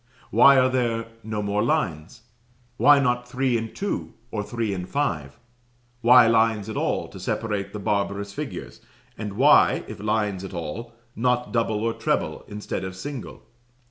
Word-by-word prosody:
Why 140 Hz, 0 st, +7 dB
are 130 Hz, 0 st, +5 dB
there 120 Hz, -3 st, 0 dB, 0.2 s
no 110 Hz, -1 st, -4 dB
more 100 Hz, +1 st, 0 dB
lines? 95 Hz, -, -1 dB, 0.5 s
Why 145 Hz, 0 st, +6 dB
not 125 Hz, -2 st, 0 dB
three 130 Hz, 0 st, 0 dB
and 115 Hz, -1 st, -2 dB
two, 200 Hz, 0 st, -3 dB, 0.2 s
or 105 Hz, -, -2 dB
three 110 Hz, -1 st, -2 dB
and 90 Hz, -1 st, -5 dB
five? 75 Hz, -, -2 dB, 0.6 s
Why 120 Hz, +1 st, +7 dB
lines 110 Hz, -2 st, +2 dB
at 110 Hz, -, -5 dB
all -, -, -1 dB
to -, -, -11 dB
separate 100 Hz, -3 st, -2 dB
the 105 Hz, -, -6 dB
barbarous 100 Hz, -1 st, -2 dB
figures; -, -, -7 dB, 0.3 s
and 105 Hz, -2 st, -5 dB
why, 135 Hz, +8 st, +5 dB
if 110 Hz, -, -8 dB
lines 105 Hz, -2 st, -1 dB
at 95 Hz, -1 st, -7 dB
all, 115 Hz, +8 st, -6 dB, 0.2 s
not 125 Hz, +1 st, 0 dB
double 110 Hz, -2 st, 0 dB
or 115 Hz, 0 st, 0 dB
treble -, -, -1 dB
instead 105 Hz, -2 st, -5 dB
of 95 Hz, 0 st, -5 dB
single? 135 Hz, +5 st, -7 dB
110 Hz, 160 wpm, -24 LUFS, 100-125 Hz, 0.6 s, Why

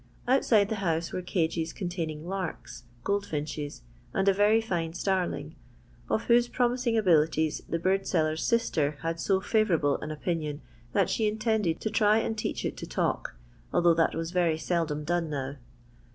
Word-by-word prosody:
Outside 225 Hz, -5 st, +4 dB
the 220 Hz, -, -2 dB
house 165 Hz, -2 st, -1 dB
were 185 Hz, -, -2 dB
cages 165 Hz, -2 st, -1 dB
con 185 Hz, -, -4 dB
taining 160 Hz, -4 st, -4 dB
larks, 185 Hz, -8 st, -5 dB, 0.2 s
goldfinches, 150 Hz, -, -3 dB, 0.3 s
and 195 Hz, 0 st, +1 dB
a 195 Hz, -, +6 dB
very 205 Hz, +3 st, +4 dB
fine 170 Hz, -7 st, -2 dB
starling, 180 Hz, -4 st, -1 dB, 0.6 s
of 220 Hz, -, +1 dB
whose 240 Hz, 0 st, +4 dB
promising 245 Hz, -1 st, +1 dB
abilities 160 Hz, -5 st, +2 dB
the 165 Hz, -, 0 dB
bird 190 Hz, +3 st, +1 dB
seller's 155 Hz, -2 st, +1 dB
sister 155 Hz, -11 st, +1 dB
had 165 Hz, 0 st, -2 dB
so 190 Hz, +2 st, +2 dB
fiivourable 190 Hz, -8 st, +1 dB
an 150 Hz, -, -5 dB
opinion 155 Hz, -1 st, -3 dB, 0.3 s
that -, -, +3 dB
she 220 Hz, -, +1 dB
intended 215 Hz, -5 st, 0 dB
to 220 Hz, -, -2 dB
try 215 Hz, -1 st, +4 dB
and 225 Hz, 0 st, -1 dB
teach 215 Hz, -, -3 dB
it -, -, -3 dB
to -, -, -6 dB
talk, -, -, -1 dB, 0.4 s
although 170 Hz, -1 st, +4 dB
that 165 Hz, 0 st, +2 dB
was 165 Hz, +1 st, -3 dB
very 175 Hz, -3 st, +2 dB
seldom 160 Hz, -3 st, -1 dB
done 170 Hz, +1 st, 0 dB
now. 140 Hz, -1 st, -4 dB
175 Hz, 165 wpm, -28 LUFS, 160-210 Hz, 0.6 s, a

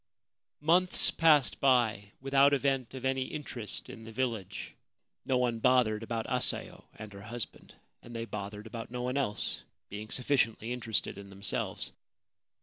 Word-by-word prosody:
Months 175 Hz, +4 st, +3 dB
passed 150 Hz, -6 st, +4 dB
by 115 Hz, -7 st, +3 dB
without 135 Hz, +1 st, +5 dB
event 135 Hz, -2 st, 0 dB
of 130 Hz, 0 st, -5 dB
any 130 Hz, 0 st, +1 dB
interest 125 Hz, -8 st, -5 dB
in 115 Hz, -, -9 dB
the 115 Hz, -, -9 dB
village. 110 Hz, -6 st, -3 dB, 0.5 s
No 130 Hz, -, +3 dB
one 120 Hz, -2 st, +1 dB
bothered 120 Hz, -3 st, +4 dB
about 115 Hz, 0 st, -2 dB
Asayo -, -, -1 dB
and 105 Hz, -1 st, -9 dB
her 100 Hz, -, -9 dB
husband; 115 Hz, +3 st, -7 dB, 0.3 s
and 120 Hz, -, -10 dB
they 115 Hz, 0 st, -2 dB
bothered 105 Hz, -1 st, -6 dB
about 115 Hz, 0 st, -6 dB
no 125 Hz, +1 st, -4 dB
one 125 Hz, +1 st, -1 dB
else, 130 Hz, -7 st, -1 dB, 0.3 s
being 105 Hz, +1 st, -6 dB
sufficiently 120 Hz, -3 st, +1 dB
interested 115 Hz, -4 st, -1 dB
in 100 Hz, -1 st, -10 dB
themselves. 100 Hz, -1 st, -2 dB
120 Hz, 145 wpm, -31 LUFS, 110-130 Hz, 0.5 s, without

